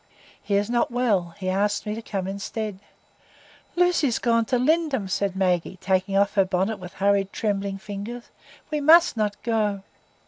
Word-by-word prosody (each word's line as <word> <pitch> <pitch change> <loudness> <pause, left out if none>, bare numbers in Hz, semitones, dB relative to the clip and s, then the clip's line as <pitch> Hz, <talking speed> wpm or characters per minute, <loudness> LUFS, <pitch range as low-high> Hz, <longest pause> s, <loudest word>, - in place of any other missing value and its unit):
"He 200 - -1
is 200 +1 +1
not 240 0 +1
well; 210 -9 0
he 190 -2 -5
asked 205 +3 0
me 210 - -2
to 225 - -5
come 195 -4 -4
instead." 200 +1 -4 1.0
"Lucy 355 -4 +3
is 240 - 0
gone 230 -2 +2
to 250 +2 +1
Lindum," 285 - +1
said 190 0 -1
Maggie, 185 -1 0
taking 190 +1 0
off 200 0 +2
her 195 - +4
bonnet 190 +3 -1
with 180 -1 -9
hurried, 200 0 +1
trembling 200 -2 -2
fingers. 205 +5 -7 0.4
"We 300 -1 -1
must 325 +2 +6
not 210 -2 -1
go." 210 -4 0
205 Hz, 170 wpm, -24 LUFS, 195-235 Hz, 1.0 s, must